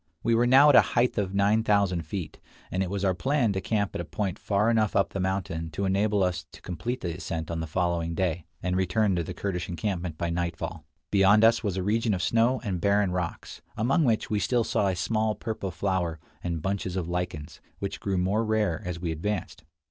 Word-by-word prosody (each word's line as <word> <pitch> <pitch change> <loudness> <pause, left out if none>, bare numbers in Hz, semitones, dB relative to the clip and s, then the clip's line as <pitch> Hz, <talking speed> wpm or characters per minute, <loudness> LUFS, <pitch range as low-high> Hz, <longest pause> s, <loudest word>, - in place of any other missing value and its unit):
We 115 - +2
were 120 +1 +3
now 135 +4 +7
at 145 - +6
a - - +10
height 120 -2 +1
of 100 -1 -2
nine 100 +3 +3
thousand 95 -6 +1
feet, 85 -2 -5 0.3
and 90 - -1
it 95 - -1
was 100 0 -2
our 95 - +3
plan 130 +1 +1
to 95 - -2
camp 100 0 -1
at - - -3
a - - -4
point 95 0 -3
far 105 +3 +1
enough 110 -3 +1
up 100 - +3
the 100 - -5
mountain 90 -4 -2
to 100 +6 -1
enable 100 +1 +2
us 90 -2 -1
to - - -12
complete 105 +9 -4
the 85 -2 -3
ascent 80 -3 -4
on 85 - -2
the 80 - -3
following 85 0 -1
day, 85 -3 -1 0.2
and 90 0 0
return 95 +2 +2
to 85 - 0
the 90 +2 -6
Kurdish 90 -3 -3
encampment 90 -3 -3
by 85 0 -2
nightfall. 85 -2 -3 0.3
Beyond 100 +2 +5
us 115 +1 +5
was 100 -3 -1
a 95 - -1
region 110 +1 +1
of 90 - -3
snow 115 +3 +2
and 95 -6 -2
barren 100 -1 +2
rocks, 90 -2 -4 0.2
among 135 +9 +2
which 115 -5 +1
we 105 - 0
still 120 +2 +1
saw 100 - +1
a 95 - 0
small 110 +3 0
purple 110 -4 -4
flower 90 -2 -1 0.2
and 85 -3 -3
bunches 95 -2 -2
of 90 -3 -2
lichens, 85 -3 -4 0.2
which 100 - -4
grew 100 -2 -1
more 95 +5 +1
rare 110 -6 0
as 90 -3 -4
we 85 -1 -2
advanced. 85 0 -4
95 Hz, 225 wpm, -27 LUFS, 85-105 Hz, 0.3 s, a